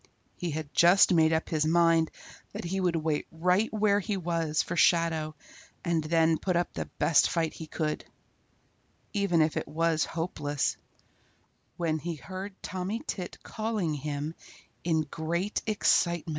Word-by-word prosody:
He 175 - -3
had 155 -1 -5
just 180 +2 +6
made 160 -2 +4
up 160 0 0
his 155 -2 +1
mind 165 0 +4 0.4
that - - -5
he 185 +3 -2
would 180 -2 +1
wait 155 -2 -1
right 180 +6 +1
where 210 -1 +2
he 205 0 -2
was 165 -3 0
for - - -4
Shadow 165 -3 +2 0.5
and 170 -2 +1
then 160 0 +2
put 185 -2 -1
up 175 0 0
the - - -4
best 160 - +4
fight 165 -2 0
he 160 - -8
could, 155 -1 -2 1.1
even 195 -6 +3
if 155 - -1
it - - -2
was 165 0 +1
hopeless, 150 -4 -2 1.0
when 160 -2 0
he 170 +1 -4
heard 190 +8 -7
Tommy 190 +6 -3
Tit 180 - -5
calling 215 -6 -2
to - - -3
him 150 +1 -3 0.5
in 160 -2 +2
great 165 +6 -2
excitement. 175 -5 +2
165 Hz, 155 wpm, -29 LUFS, 160-180 Hz, 1.1 s, just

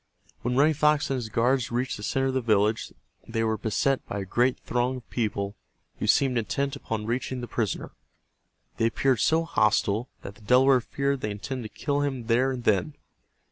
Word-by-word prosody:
When 125 +1 -1
Running 150 +4 +4
Fox 150 -1 +2
and 135 - +1
his 115 -3 -4
guards 125 +3 +1
reached 125 +2 -1
the - - -9
center 135 +5 0
of 135 - 0
the 130 - +1
village 110 -1 +1 0.4
they 115 0 -1
were 110 0 +1
beset 115 +6 0
by - - -4
a - - -5
great 125 +6 +1
throng 125 +1 -1
of 125 - -13
people 100 -4 -2 0.5
who - - -2
seemed 130 -3 +3
intent 140 +5 -2
upon 110 -1 -4
reaching 125 +2 -2
the 120 - -5
prisoner. 110 -6 -2 0.9
They 115 - +3
appeared 130 +1 +1
so 160 +9 +3
hostile 110 -5 +1
that 100 - -7
the 100 - -20
Delaware 125 +4 +5
feared 140 +2 -2
they 105 - -2
intended 110 +2 -5
to - - -19
kill 145 -1 +1
him 135 -5 -2
there 120 +3 +2
and 125 -2 -5
then. 110 +9 +1
125 Hz, 195 wpm, -26 LUFS, 110-135 Hz, 0.9 s, Delaware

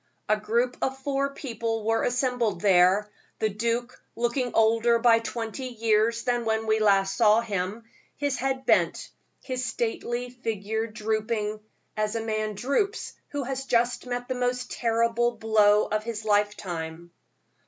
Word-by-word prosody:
A 215 - +4
group 235 +4 0
of 265 0 -1
four 275 +1 -1
people 230 -5 -3
were 225 0 +2
assembled 245 -6 0
there, 190 +1 +4 0.3
the 220 - +1
duke 235 +4 -2
looking 240 +1 0
older 230 +1 +4
by 230 -1 +5
twenty 230 +2 -5
years 230 -1 +1
than 240 -1 0
when 220 0 0
we 220 0 +2 0.3
saw 210 +2 +4
him 200 -4 -2
last, 225 +1 -15 0.3
his 285 -2 -1
head 265 0 -2
bent, - - +2 0.3
his 255 -1 -3
stately 240 +1 -2
figure 220 -2 -3
drooping, 215 -1 -2 0.4
as 215 0 -1
a 225 - -1
man 215 -1 -2
droops 280 - -1
who 285 -1 -3
has 270 +1 -4
just 240 0 +1
met 245 0 -3
the 255 - -1
most 250 0 -2
terrible 235 +1 +1
blow 215 -2 +4
of 215 0 -2
his 220 -1 -5
lifetime. 175 -6 -1
230 Hz, 145 wpm, -26 LUFS, 215-245 Hz, 0.4 s, by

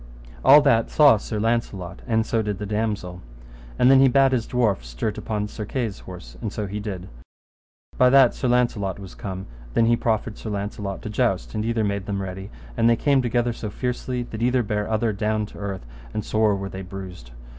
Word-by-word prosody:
All 150 +2 +9
that 115 -5 +3
saw 145 -7 +6
Sir 105 +1 -4
Launcelot, 105 -5 -2
and 110 -2 +1
so 115 -1 0
did 105 -2 -3
the 105 - -5
damosel. 105 -4 -3 0.6
And 125 - +5
then 135 - +7
he 135 - +7
bade 135 +1 +4
his 120 -3 0
dwarf 115 -6 +1
stert - - -4
upon 105 -1 -2
Sir 105 +1 -6
Kay's 110 -2 -3
horse, - - -11
and - - -3
so 105 - -3
he 100 +1 -4
did. 95 -4 -5 0.9
By 125 - +6
that 135 -2 +6
Sir 130 - -2
Launcelot 120 -6 +1
was 95 -2 -10
come, 95 -1 -6 0.3
then 115 - +4
he 120 +1 +4
proffered 110 -1 -1
Sir 110 - -6
Launcelot 100 -1 -4
to - - -5
joust; - - 0
and 105 - -2
either 115 0 0
made 100 -1 -2
them 100 -1 -2
ready, 95 +1 -6 0.3
and 115 - +3
they 115 - +5
came 140 +3 +2
together 120 0 0
so 110 -2 -6
fiercely 125 +2 -3
that 115 -2 -8
either 125 +1 +2
bare 105 -1 -1
down - - -6
other 110 0 +1 0.3
to - - -14
the - - -11
earth, 100 -7 -5 0.3
and 105 - -2
sore 110 -1 +2
were 100 0 -4
they 95 - -7
bruised. 90 -8 -9
110 Hz, 210 wpm, -23 LUFS, 100-120 Hz, 0.9 s, All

